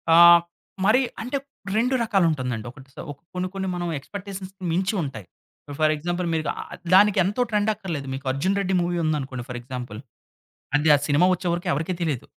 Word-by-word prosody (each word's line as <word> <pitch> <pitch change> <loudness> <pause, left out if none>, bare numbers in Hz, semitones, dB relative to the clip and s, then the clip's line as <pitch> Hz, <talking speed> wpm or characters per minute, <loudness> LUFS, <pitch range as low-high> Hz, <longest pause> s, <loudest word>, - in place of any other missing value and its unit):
ఆ! - - +7 0.7
మరి 225 +5 +5 0.2
అంటే 255 +5 -2 0.4
రెండు 250 +4 +2
రకాలుంటుందండి. 155 - 0
ఒకటి 135 +1 -16
సో, - - -7 0.3
కొన్ని 180 0 -2
కొన్ని 190 0 -3
మనం 175 -1 -3
ఎక్స్‌పెక్టేషన్స్ 195 +3 -7 0.2
మించి 185 +4 0
ఉంటాయి. 125 -9 -6 0.5
ఫర్ 155 0 +4
ఎగ్జాంపుల్ 175 +3 -2
మీరు 155 -1 -1
ఆహ్, - - -7 0.2
దానికి 205 +1 +6
ఎంతో 205 +6 -1
ట్రెండ్ 210 0 +2
అక్కర్లేదు. 160 -9 -5
మీకు 135 +1 -6
'అర్జున్ 185 +9 0
రెడ్డి' 190 -1 0
మూవీ 175 0 -1
ఉందనుకోండి 135 -5 -2
ఫర్ 125 - -4
ఎగ్జాంపుల్. 125 -4 -7 0.8
అది 150 +2 +2
ఆ - - +3
సినిమా 145 +5 +4
వచ్చేవరకు 175 -1 -2
ఎవరికీ 165 +5 -1
తెలియదు. 150 -7 -1
175 Hz, 165 wpm, -24 LUFS, 140-190 Hz, 0.8 s, ఆ